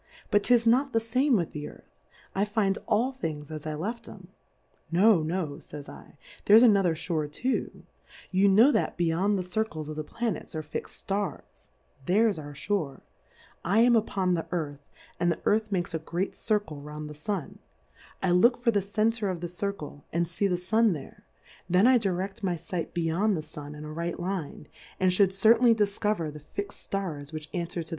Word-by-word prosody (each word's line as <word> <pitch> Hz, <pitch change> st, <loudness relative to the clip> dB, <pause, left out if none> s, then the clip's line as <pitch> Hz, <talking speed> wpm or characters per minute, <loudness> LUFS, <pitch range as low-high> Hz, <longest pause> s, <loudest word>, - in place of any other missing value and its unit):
But 205 Hz, 0 st, +4 dB
'tis 240 Hz, -2 st, +4 dB
not 260 Hz, +4 st, +3 dB
the 225 Hz, -, +4 dB
fame 250 Hz, +4 st, +2 dB
with 175 Hz, -6 st, 0 dB
the 150 Hz, 0 st, -5 dB
Earth, -, -, -18 dB, 0.4 s
I 195 Hz, -, +1 dB
find 205 Hz, -1 st, 0 dB
all 245 Hz, +5 st, +2 dB
Things 160 Hz, -, -5 dB
as 155 Hz, 0 st, -6 dB
I 155 Hz, -, -2 dB
left 225 Hz, +9 st, -4 dB
"^em. 185 Hz, -3 st, -12 dB, 0.6 s
No, 190 Hz, +1 st, +5 dB
no, 170 Hz, +3 st, -1 dB, 0.2 s
pys -, -, -20 dB, 0.2 s
7, -, -, -13 dB, 0.3 s
there's 220 Hz, +4 st, +8 dB
another 195 Hz, -8 st, +5 dB
Shoar 160 Hz, -2 st, -2 dB
too; 250 Hz, -, -3 dB, 0.5 s
You 190 Hz, +2 st, +4 dB
know 225 Hz, +9 st, +6 dB
that -, -, 0 dB
be 175 Hz, -, +1 dB
yond 190 Hz, +5 st, +1 dB
the 185 Hz, -, -2 dB
Circles 180 Hz, -5 st, -3 dB
of 155 Hz, -, -5 dB
the 155 Hz, -, -3 dB
Planets 225 Hz, -1 st, -4 dB
are 155 Hz, -, -3 dB
fix'd 150 Hz, -, -6 dB
Stars, 195 Hz, -4 st, -4 dB, 0.4 s
there's 205 Hz, 0 st, +3 dB
our 145 Hz, -1 st, -8 dB
Shoar, 145 Hz, -3 st, -2 dB, 0.6 s
I 200 Hz, +6 st, +3 dB
am 240 Hz, 0 st, +6 dB
upon 195 Hz, -4 st, +1 dB
the 165 Hz, -2 st, -2 dB
Earth, 150 Hz, -5 st, -3 dB, 0.4 s
and 175 Hz, 0 st, +2 dB
the 165 Hz, -, -3 dB
Earth 215 Hz, 0 st, +2 dB
makes 175 Hz, -2 st, -1 dB
a 160 Hz, -, -1 dB
great 175 Hz, +4 st, -3 dB
Circle 205 Hz, -9 st, -1 dB
round 150 Hz, +1 st, -7 dB
the 150 Hz, -, -8 dB
Sun; 160 Hz, +3 st, -4 dB, 0.6 s
I 185 Hz, -, +2 dB
look 235 Hz, +8 st, +5 dB
for 235 Hz, -, +4 dB
the 205 Hz, -2 st, +2 dB
Center 215 Hz, +2 st, 0 dB
of 180 Hz, -2 st, -3 dB
the 175 Hz, -, -4 dB
Circle 175 Hz, -5 st, -5 dB
and 170 Hz, +1 st, 0 dB
fee 180 Hz, +4 st, 0 dB
the 180 Hz, -2 st, 0 dB
Sun 215 Hz, +4 st, +2 dB
there, 150 Hz, -, -10 dB, 0.4 s
then 180 Hz, +4 st, +4 dB
I 255 Hz, -1 st, +6 dB
direct 195 Hz, +1 st, -2 dB
my 180 Hz, -3 st, 0 dB
fight 170 Hz, +1 st, -5 dB
beyond 175 Hz, +4 st, +1 dB
the 155 Hz, -, -4 dB
Sun 150 Hz, -1 st, -9 dB
in 150 Hz, 0 st, -8 dB
a 155 Hz, -, -7 dB
right 170 Hz, +1 st, -3 dB
Line, 175 Hz, -5 st, -4 dB, 0.3 s
and 185 Hz, -1 st, +3 dB
lliould 190 Hz, +1 st, +4 dB
certainly 230 Hz, +4 st, +5 dB
difcover 205 Hz, -6 st, 0 dB
the 150 Hz, -, -9 dB
fix'd 200 Hz, +7 st, -6 dB
Stars 160 Hz, -8 st, -4 dB
which 155 Hz, -1 st, -7 dB
anfwer 170 Hz, -1 st, -3 dB
to -, -, -6 dB
185 Hz, 195 wpm, -28 LUFS, 160-210 Hz, 0.6 s, there's